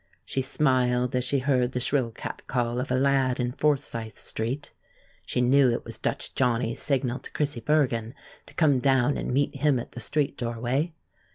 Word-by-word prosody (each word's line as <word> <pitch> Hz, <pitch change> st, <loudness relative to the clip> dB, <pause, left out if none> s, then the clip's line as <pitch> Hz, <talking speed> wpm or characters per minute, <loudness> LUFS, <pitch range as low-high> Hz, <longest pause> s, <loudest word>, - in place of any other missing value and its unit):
She 135 Hz, -, -1 dB
smiled 125 Hz, -3 st, +1 dB
as 125 Hz, -, +1 dB
she 140 Hz, +2 st, +1 dB
heard 130 Hz, -2 st, +1 dB
the 125 Hz, -, -1 dB
shrill 130 Hz, -1 st, +2 dB
catcall 120 Hz, +1 st, -3 dB
of 130 Hz, -, -3 dB
a 130 Hz, -, +1 dB
lad 135 Hz, -1 st, +2 dB
in 125 Hz, 0 st, 0 dB
Forsyth 130 Hz, -6 st, -1 dB
Street. 125 Hz, +6 st, -4 dB, 0.5 s
She 125 Hz, -, 0 dB
knew 130 Hz, +1 st, +5 dB
it 120 Hz, -, -2 dB
was -, -, -6 dB
Dutch -, -, -3 dB
Johnny's 120 Hz, -1 st, +1 dB
signal 130 Hz, -3 st, 0 dB
to -, -, -11 dB
Chrissie 145 Hz, -4 st, 0 dB
Bergen 120 Hz, -3 st, +1 dB, 0.3 s
to -, -, -13 dB
come 145 Hz, -5 st, +3 dB
down 130 Hz, +1 st, +3 dB
and -, -, -3 dB
meet 140 Hz, +2 st, 0 dB
him 145 Hz, -1 st, +3 dB
at 120 Hz, -, -6 dB
the 125 Hz, -, -8 dB
street 145 Hz, +2 st, -1 dB
doorway. 120 Hz, +7 st, -1 dB
130 Hz, 180 wpm, -26 LUFS, 120-140 Hz, 0.5 s, knew